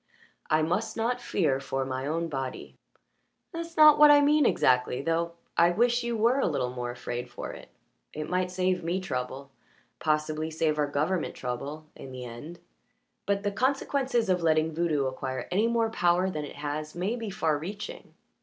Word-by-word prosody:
"I 155 0 +3
must 180 +7 -1
not 245 +2 0
fear 150 - 0
for 135 -1 -2
my 130 +1 -3
own 165 +2 -1
body." 135 -4 -5 0.8
"That's 335 -1 -7
not 305 -1 +8
what 300 0 +9
I 290 0 +8
mean 290 -1 +4
exactly, 125 +1 +2
though 165 +1 0 0.2
I 170 0 +5
wish 240 +6 +2
you 235 -1 -2
were 235 +5 +3
a - - +2
little 135 -6 -1
more 125 -1 -4
afraid 120 0 -5
for - - -6
it. - - -12 0.4
It 155 0 -5
might 180 +1 0
save 185 -1 0
me 175 +3 -1
trouble 135 -5 -5 0.5
possibly 155 0 0
save 155 -1 0
our 145 - +2
government 155 +5 -1
trouble 140 +5 -5
in 135 - -10
the 130 -1 -7
end. 125 +9 -9 0.7
But 200 0 0
the 205 - 0
consequences 260 +1 0
of 180 -2 +1
letting 160 -1 +2
voodoo 155 -4 0
acquire 130 -1 -4
any 205 +5 +2
more 230 -1 +1
power 180 -1 +2
than 150 -3 -4
it - - -10
has 150 +2 -4
may 190 +7 -1
be 230 -3 -5
far 160 -6 0
reaching." 200 +6 -7
165 Hz, 180 wpm, -28 LUFS, 145-210 Hz, 0.8 s, what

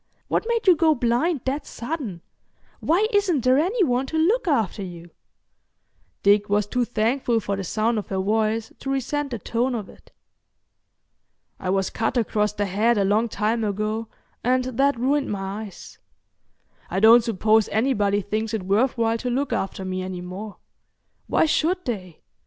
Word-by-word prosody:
What - - 0
made 465 -1 0
you 370 -3 +7
go 315 -1 +3
blind 245 +6 +1
that 275 +3 -2
sudden? 235 - -5 0.6
Why 365 +7 +2
isn't 385 -8 +2
there 255 +2 +4
any 385 +7 +2
one 255 -3 +1
to 320 - -3
look 385 +8 +2
after 225 - +1
you?" 175 -2 -8 1.1
Dick 205 +1 +4
was 205 0 +2
too 245 +4 0
thankful 235 +1 0
for 200 -2 -2
the 195 - -4
sound 220 +5 0
of 205 - -7
her 190 - -3
voice 220 +3 0
to 270 - -5
resent 275 +2 -1
the 240 - -4
tone 240 +4 -1
of 210 -4 -5
it. - - -18 1.5
"I 185 - -4
was 195 0 0
cut 225 +3 -1
across 210 -2 +1
the 205 0 -2
head 215 +5 +2
a 200 - +2
long 215 +4 +2
time 220 +2 0
ago, 215 +2 -2 0.4
and 255 +1 +2
that 260 +1 +1
ruined 275 +3 +1
my 200 +2 -4
eyes. 195 - -12 0.9
I 185 - -1
don't 225 +3 +7
suppose 220 -1 +2
anybody 205 -3 +1
thinks 215 +2 -2
it 210 - -3
worth 215 +8 +1
while 230 0 +1
to 250 - -3
look 270 +3 -1
after 190 0 -3
me 185 0 -3
any 185 -1 -5
more. 195 +4 -7 0.7
Why - - +3
should 345 +4 0
they? 185 -9 -5
225 Hz, 170 wpm, -23 LUFS, 205-265 Hz, 1.5 s, you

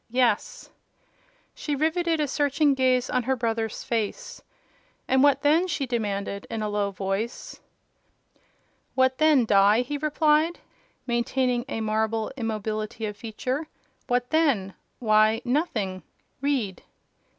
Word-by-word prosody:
"Yes." 245 0 0 0.8
She 295 - -3
riveted 325 +2 +1
a 300 - +1
searching 285 +1 +2
gaze 255 -1 +2
on 255 - 0
her 265 +2 0
brother's 225 -2 -2
face. 225 -3 -3 0.7
"And 260 0 +3
what 280 0 +4
then?" 320 +5 +4
she 285 -6 -2
demanded, 200 -5 -3
in 225 -1 -3
a 210 - -1
low 205 -1 0
voice. 195 +4 -4 1.4
"What 260 0 +2
then, 305 -6 +5
Die?" 205 +2 +5
he 285 +4 -4
replied, 305 +2 +2 0.5
maintaining 245 0 0
a 225 - -3
marble 220 0 -1
immobility 215 -2 -3
of 210 -1 -4
feature. 250 +8 -4 0.4
"What 245 0 0
then? 275 -13 +2 0.2
Why—nothing. 220 - +1 0.4
Read." 260 -10 -1
245 Hz, 115 wpm, -25 LUFS, 215-285 Hz, 1.4 s, then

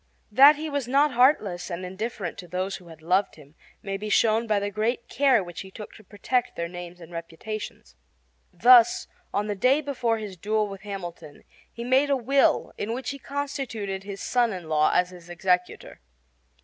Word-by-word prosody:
That 275 +7 +8
he 310 +2 -5
was 285 -4 -2
not 280 +3 +3
heartless 215 -9 +2
and 180 +1 -5
indifferent 190 -1 -5
to 180 - -9
those 185 +3 -3
who 180 - -17
had 160 -1 -14
loved 185 +4 +1
him 145 -1 -17 0.3
may 195 -1 -3
be 210 +2 -5
shown 225 +2 +3
by 215 -1 +2
the 205 0 -3
great 225 +4 -1
care 265 -7 +3
which 175 -2 -8
he 190 - -10
took 210 +2 -10
to 220 - -15
protect 240 +5 -2
their 170 - -3
names 175 0 -9
and 170 0 -13
reputations. 170 - -7 0.6
Thus, 240 +5 +6 0.3
on 205 +1 -1
the 210 - -2
day 255 +8 +3
before 255 -6 -1
his 210 -3 -7
duel 215 +4 0
with 195 -1 -9
Hamilton, 175 -7 -8 0.3
he 235 - -7
made 260 +4 +3
a 280 - +3
will 270 +3 +2
in 225 +3 -2
which 255 +1 -4
he 280 - -8
constituted 265 -9 -4
his 200 -1 -7
son 240 -2 +2
in 180 -3 -7
law 155 -1 +3
as 180 0 +2
his 175 -1 -14
executor. 180 0 -1
205 Hz, 190 wpm, -25 LUFS, 180-245 Hz, 0.6 s, That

